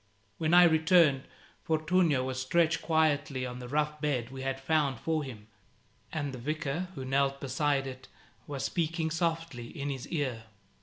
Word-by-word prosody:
When 160 +1 +3
I 180 - +9
returned, 160 -4 +4 0.4
Fortunio 160 -3 +2
was 130 0 -3
stretched 165 +4 +2
quietly 150 -4 +1
on 125 0 -6
the 125 - -7
rough 150 +2 -1
bed 130 -5 -1
we 135 0 -7
had 135 0 -2
found 140 -3 +1
for 160 -2 -1
him, 115 -6 -9 0.7
and 145 -4 -3
the 130 - -6
Vicar, 155 +5 -2
who 130 - -5
knelt 140 +1 +1
beside 140 +1 0
it, 130 -1 -8 0.4
was 140 -2 -4
speaking 165 -1 -1
softly 165 -7 -2
in 140 +3 -4
his 135 -2 -6
ear. 130 -8 -2
145 Hz, 160 wpm, -30 LUFS, 130-160 Hz, 0.7 s, I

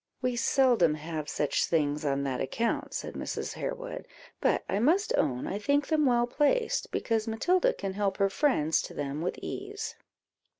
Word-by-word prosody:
"We 250 -1 -1
seldom 240 - +3
have 155 0 -5
such 150 - +1
things 150 -2 0
on 140 -1 0
that 130 -2 -2
account," 230 - -1
said - - -4
Mrs. - - -4
Harewood; - - -5 0.3
"but - - +2
I 195 - 0
must 340 - +3
own 130 -5 0
I 200 - -3
think 285 +6 +2
them 305 -3 +3
well 240 -1 +3
placed, 305 - +1
because 225 -1 0
Matilda 360 - +2
can 195 - -4
help 195 -1 -1
her 200 - +3
friends 165 - +2
to - - -8
them 145 +2 -3
with 175 - -2
ease." 405 +2 -5
220 Hz, 170 wpm, -29 LUFS, -, 0.3 s, seldom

